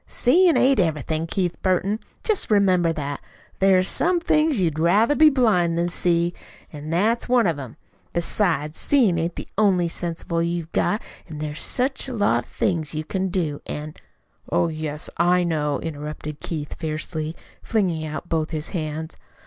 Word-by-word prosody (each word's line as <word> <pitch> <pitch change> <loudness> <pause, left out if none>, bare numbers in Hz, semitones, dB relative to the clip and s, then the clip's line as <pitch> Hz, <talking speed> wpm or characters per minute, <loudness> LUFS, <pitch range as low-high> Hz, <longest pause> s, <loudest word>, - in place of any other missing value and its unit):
"Seein' 340 +7 +4
ain't 270 -1 +4
everything, 160 -1 0
Keith 175 0 -1
Burton. 190 +3 +1 0.2
Jest 430 - +2
remember 185 -5 +3
that. 145 -3 -4 0.4
There 195 -1 +5
is 185 +1 +2
some 350 +1 +1
things 305 -5 +2
you'd 160 -4 0
rather 205 - +4
be 310 +1 +7
blind 205 - +2
than 170 +1 +1
see. 170 0 +1 0.4
An' 150 +1 -7
that's 215 +9 +1
one 245 -2 +4
of 165 -5 0
'em. 130 -4 -8 0.3
Besides, 170 -4 0
seein' 225 -12 +3
ain't 165 +1 -2
the - - -6
only 185 -5 +3
sensible 170 0 -2
you've 170 -1 -2
got, 210 - 0 0.3
an' 155 - -7
there's 150 0 -4
such 265 +2 -1
a 260 - -5
lot 160 - +1
of - - -22
things 160 -5 -1
you 155 - -2
can 190 +4 -2
do, 165 -6 -2
an' 150 +1 -5 0.3
" - - -25
"Oh, 170 - +2
yes, 155 -1 -4
I 180 +1 +3
know," 150 -4 0
interrupted 150 -1 -6
Keith 150 -3 -5
fiercely, 155 0 -4 0.3
flinging 180 -8 0
out 155 +2 -5
both 160 -2 -1
his 155 -2 -4
hands. 160 -1 -4
170 Hz, 170 wpm, -23 LUFS, 155-200 Hz, 0.4 s, be